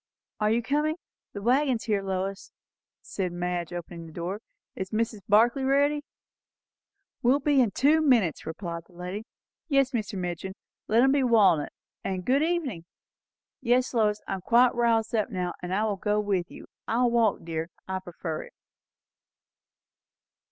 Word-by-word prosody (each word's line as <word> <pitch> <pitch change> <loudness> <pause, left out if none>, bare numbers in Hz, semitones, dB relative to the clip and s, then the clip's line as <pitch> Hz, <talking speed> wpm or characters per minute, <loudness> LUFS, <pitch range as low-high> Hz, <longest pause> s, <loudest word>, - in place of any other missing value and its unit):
"Are 210 0 +2
you 230 +2 +1
coming? 300 +4 +1 0.4
The 200 - -6
waggon's 255 0 +2
here, 210 -3 0
Lois," 195 0 -3 0.5
said 185 -3 -3
Madge, 175 -1 -3
opening 170 -1 -7
the - - -12
door. 180 +6 -4 0.3
"Is 190 -1 -4
Mrs. 220 +1 -1
Barclay 230 +6 +4
ready?" 285 +2 +2 1.2
"Will 265 +3 +4
be 285 -1 +3
in 235 - +3
two 290 +9 +3
minutes," 235 - +2
replied 170 0 -5
that 180 - -22
lady. 180 +5 -6 0.4
"Yes, 275 -4 +3
Mr. 215 -6 -3
Midgin, 180 +1 -4 0.3
let 225 +2 +4
them 265 +1 +5
be 280 0 +3
walnut; 205 - +4 0.3
and 185 -2 -3
good 270 +3 +3
evening! 310 - -1 0.8
Yes, 250 +1 +2
Lois, 210 -3 +1
I - - -2
am 190 - -4
quite 240 +6 +4
roused 230 -2 +1
up 215 -3 +1
now, 180 -2 -2
and 180 0 -5
I 200 +3 +1
will 210 -2 0
go 210 +2 0
with 195 -4 -1
you. - - -11 0.2
I 235 +2 +1
will 240 - +3
walk, 230 -3 +2
dear; 165 0 -4 0.2
I 190 0 -2
prefer 170 -3 -5
it." - - -13
210 Hz, 160 wpm, -27 LUFS, 180-250 Hz, 1.2 s, them